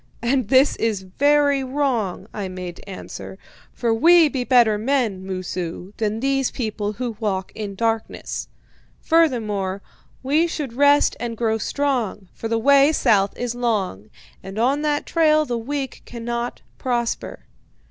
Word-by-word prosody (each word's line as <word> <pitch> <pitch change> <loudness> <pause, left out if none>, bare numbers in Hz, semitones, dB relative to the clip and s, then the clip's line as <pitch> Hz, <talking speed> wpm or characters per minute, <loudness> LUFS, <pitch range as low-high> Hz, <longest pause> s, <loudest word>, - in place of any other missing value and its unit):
"'And 250 -1 +1
this 265 +3 +4
is 215 -4 -1
very 285 +7 +2
wrong,' 255 -9 -1
I 200 -2 -4
made 180 -2 -7
to - - -13
answer; 190 0 -8 0.3
'for 235 -2 0
we 330 +6 +6
be 260 -3 -2
better 235 -4 +4
men, 225 -6 0
Moosu, 185 0 -5
than 215 0 -1
these 270 -1 +1
people 215 -3 -3
who 240 0 -4
walk 190 -4 -2
in 205 -2 -5
darkness. 225 +1 -2 0.5
Further, 215 - +1 0.4
we 300 +6 +2
should 295 -7 -4
rest 285 +3 +4
and 235 -1 -4
grow 225 -1 0
strong, 245 -9 -2
for 225 - -5
the 230 0 0
way 280 +5 +5
south 200 -9 +2
is 245 -1 -2
long, 205 - -2 0.3
and 195 +2 -9
on 265 +6 +2
that 295 -1 0
trail 310 -2 +3
the 240 -4 -2
weak 270 +2 -4
cannot 235 0 -5 0.2
prosper.'" 240 -2 -2
235 Hz, 145 wpm, -22 LUFS, 205-275 Hz, 0.5 s, we